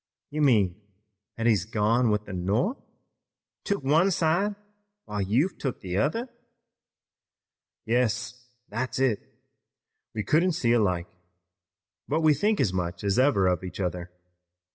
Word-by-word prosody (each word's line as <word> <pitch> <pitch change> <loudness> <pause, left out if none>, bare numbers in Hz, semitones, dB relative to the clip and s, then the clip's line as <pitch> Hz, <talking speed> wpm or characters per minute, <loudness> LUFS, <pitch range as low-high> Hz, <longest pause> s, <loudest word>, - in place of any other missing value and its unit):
"You 150 +1 -2
mean 105 -8 +3 0.6
that 115 - -2
he's 110 -6 +3
gone 110 +3 +1
with 105 0 0
the 100 - -8
North, 105 - 0 0.8
took 200 -7 -2
one 160 +8 +4
side 185 +4 +1 0.5
while 105 -1 -3
you've 120 - +1
took 135 -4 -3
the 90 0 -3
other?" 165 - 0 1.6
"Yes, 120 +1 -1 0.2
that's 120 +4 -3
it. 130 -5 +2 1.0
We 105 - -1
couldn't 170 - +2
see 125 -8 +1
alike, 90 -7 +2 1.0
but 155 +3 0
we 155 -1 +5
think 205 +9 +1
as 105 -8 +2
much 90 0 -3
as 100 +3 +1
ever 120 -8 +4
of 90 -1 +1
each 90 0 -7
other. 90 -1 -3
115 Hz, 135 wpm, -27 LUFS, 100-150 Hz, 1.6 s, we